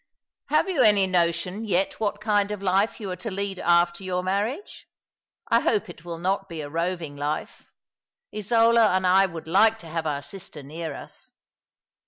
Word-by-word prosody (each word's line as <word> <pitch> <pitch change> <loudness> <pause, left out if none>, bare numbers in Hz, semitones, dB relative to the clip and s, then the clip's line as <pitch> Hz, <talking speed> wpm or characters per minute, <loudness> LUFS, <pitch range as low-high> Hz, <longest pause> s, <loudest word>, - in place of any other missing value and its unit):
'■' - - +2
Have - - +3
you 355 -8 +1
any 205 -4 +5
notion 180 +2 0
yet 195 -3 0
what 205 -1 -1
kind 205 -1 +1
of 210 -1 -5
life 195 +3 +1
you 200 -4 -5
are - - -3
to 220 +6 -5
lead 195 -1 -4
after 175 +1 +2
your 180 -1 -2
marriage? 205 - -3 0.6
I - - +4
hope 420 - 0
it 150 - -11
will 170 -1 -6
not 195 +3 -1
be 165 -2 -5
a 145 - -6
roving 165 -2 -2
life. 145 +2 -4 0.7
Isola 230 +1 +4
and 185 0 +1
I 190 +2 +5
would 165 -3 -9
like 215 +6 +4
to 170 - -13
have 160 0 -3
our 145 -1 -2
sister 155 -1 -8
near 155 +1 -6
us." - - -11
185 Hz, 185 wpm, -25 LUFS, 170-205 Hz, 0.7 s, any